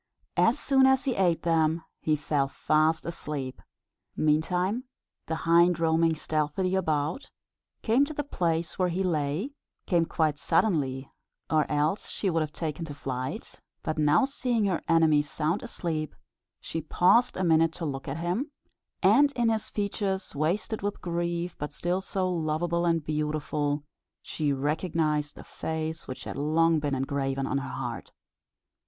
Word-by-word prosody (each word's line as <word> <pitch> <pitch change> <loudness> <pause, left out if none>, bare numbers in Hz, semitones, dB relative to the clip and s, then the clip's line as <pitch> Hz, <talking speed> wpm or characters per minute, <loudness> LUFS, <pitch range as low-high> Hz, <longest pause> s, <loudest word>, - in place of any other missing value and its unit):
As - - +4
soon 265 -1 +4
as 265 +1 +3
he 265 - +1
ate 180 -5 +1
them 165 -1 +2 0.2
he 155 - +1
fell 145 -2 0
fast 155 +3 +1
asleep. 150 -6 -4 0.5
Meantime 180 - +1 0.4
the 160 - -1
hind, 170 +1 +5
roaming 165 0 +3
stealthily 155 +4 -1
about, 160 - -1 0.5
came 240 +5 +4
to 310 - -6
the 290 - -1
place 170 - -1
where 185 - +3
he 180 +3 -1
lay 160 - -1 0.3
came 170 -3 +2
quite 155 -3 0
suddenly, 135 -9 +1 0.4
or 155 -1 +2
else 150 +6 0
she 195 - -1
would 165 -1 +1
have 155 -1 -2
taken 160 +1 -4
to 145 -3 -7
flight; 130 - -5 0.2
but 155 0 -2
now 150 - +4
seeing 250 -5 0
her 185 -4 0
enemy 160 -3 +5
sound 155 +4 -1
asleep, 160 - -3 0.4
she 165 - -4
paused 210 +10 +3
a 185 - 0
minute 165 -1 +4
to 170 - -5
look 135 -2 -4
at 140 +2 -3
him; 180 - -1 0.5
and 275 +9 +6
in 240 -3 +2
his 220 -1 -1
features, 200 -2 -2
wasted 175 +9 -1
with 205 +1 -3
grief, 170 0 -2
but 150 +1 -4
still 175 +4 -1
so 190 -1 -1
loveable 170 0 0
and 165 -3 +1
beautiful, 150 -1 -1 0.4
she 150 -2 -1
recognised 150 +1 0
the - - -10
face 160 0 -4
which 130 - -6
had - - -6
long 160 +3 +3
been 145 -2 -1
engraven 135 0 -1
on 140 - 0
her 135 -1 -6
heart. 120 -3 -5
160 Hz, 155 wpm, -28 LUFS, 150-185 Hz, 0.5 s, and